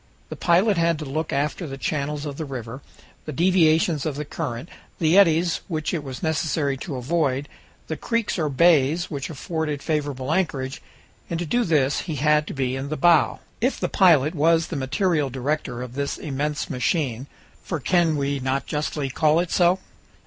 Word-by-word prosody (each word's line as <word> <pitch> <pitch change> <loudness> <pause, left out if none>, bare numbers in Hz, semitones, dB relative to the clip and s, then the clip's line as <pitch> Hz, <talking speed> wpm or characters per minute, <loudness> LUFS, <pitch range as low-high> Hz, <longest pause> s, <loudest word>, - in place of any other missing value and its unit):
The - - -5
pilot 185 +4 +3
had 165 -1 +2
to 155 - -6
look 155 +3 -3
after 150 +4 -1
the 135 -1 -6
channels 150 +1 -2
of 145 -2 -5
the 160 - -3
river, 130 -2 -6 0.4
the 155 - -4
deviations 165 -1 +3
of 155 -3 -2
the 150 +1 -4
current, 140 -3 -5 0.3
the 160 +1 +2
eddies 170 -3 +4
which 155 -3 -2
it 160 -4 -2
was 135 +1 -7
necessary 155 -3 0
to 140 +1 -6
avoid, 140 +1 0 0.4
the 160 - -4
creeks 230 +1 -1
or 155 -2 0
bays 160 +2 +3
which 140 -2 -4
afforded 155 -1 -3
favorable 145 -3 -2
anchorage, 140 -7 -1 0.5
and 170 - -2
to 175 - -2
do 240 +9 +1
this 150 - +2
he 155 - -1
had 150 +2 +2
to - - -5
be 130 -1 -1
in 135 +1 -4
the 155 - -3
bow. 170 +1 +4 0.2
If 255 +4 +1
the - - -1
pilot 160 -6 +4
was 165 +1 +2
the - - -4
material 145 +2 0
director 130 -1 -3
of 125 -1 -8
this 140 +1 -2
immense 150 +1 -3
machine 130 -2 -1 0.3
for 170 - -4
can 170 +1 +2
we 140 -1 -1
not 130 +1 -1
justly 150 -2 -2
call 155 +4 +3
it 175 -1 -2
so? 175 +1 +4
150 Hz, 185 wpm, -23 LUFS, 140-165 Hz, 0.5 s, eddies